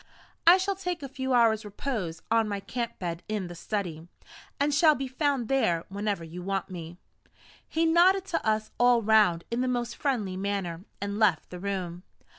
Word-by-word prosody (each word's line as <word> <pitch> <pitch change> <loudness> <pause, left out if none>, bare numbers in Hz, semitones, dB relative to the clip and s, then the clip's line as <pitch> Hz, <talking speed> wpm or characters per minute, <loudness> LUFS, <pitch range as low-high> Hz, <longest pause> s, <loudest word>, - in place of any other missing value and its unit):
I 350 +2 +10
shall 385 +1 0
take 360 -4 -4
a - - -4
few 265 0 -4
hours' 230 -3 +4
repose 205 - -4
on 225 -1 +3
my 200 -1 -2
camp 235 +4 -4
bed 170 -2 -4
in 210 -3 -2
the 175 - -7
study, 170 -3 -4 0.5
and 285 +1 +2
shall 305 +1 +5
be 270 0 -3
found 265 -2 0
there 175 -11 +1
whenever 200 -2 -2
you 165 +2 -8
want 195 +1 -3
me." 170 -1 -7 0.7
He 325 +1 +1
nodded 360 +4 +4
to - - +1
us 215 0 0
all 245 -1 +5
round 205 -6 +4
in 235 +1 0
the 255 - 0
most 245 -1 -1
friendly 225 -10 -1
manner, 190 -2 -3
and 200 +1 -3
left 190 -8 +2
the 180 - -7
room. 180 -3 -3
215 Hz, 185 wpm, -28 LUFS, 185-265 Hz, 0.7 s, I